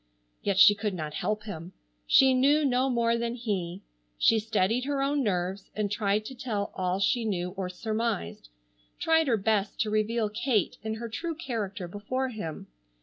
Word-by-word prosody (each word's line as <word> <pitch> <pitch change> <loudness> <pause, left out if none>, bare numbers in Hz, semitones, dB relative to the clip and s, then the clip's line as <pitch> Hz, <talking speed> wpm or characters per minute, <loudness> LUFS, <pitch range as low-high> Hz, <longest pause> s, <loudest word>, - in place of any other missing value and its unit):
Yet 200 -2 0
she 205 - +9
could 205 -1 -3
not 155 -3 -5
help 215 +6 -2
him. 180 -4 -7 0.3
She 265 -1 +6
knew 285 +4 +4
no 260 0 +2
more 235 -2 +2
than 235 0 -2
he. 195 -6 -3 0.3
She 225 - +4
steadied 220 +2 0
her 285 0 -1
own 285 +1 +1
nerves 190 -3 -2
and 205 -1 -1
tried 210 0 0
to 265 - -6
tell 225 -5 -3
all 185 0 -1
she 235 +4 +2
knew 180 -5 -2
or 190 -1 -4
surmised, 215 - -3 0.5
tried 320 -1 +3
her 235 -4 +3
best 210 0 0
to 215 -1 0
reveal 215 +1 +1
Kate 215 0 0
in 220 0 -3
her 235 +1 -5
true 330 +9 -4
character 215 - -4
before 235 +8 -3
him. 185 -10 -6
215 Hz, 175 wpm, -28 LUFS, 195-240 Hz, 0.5 s, she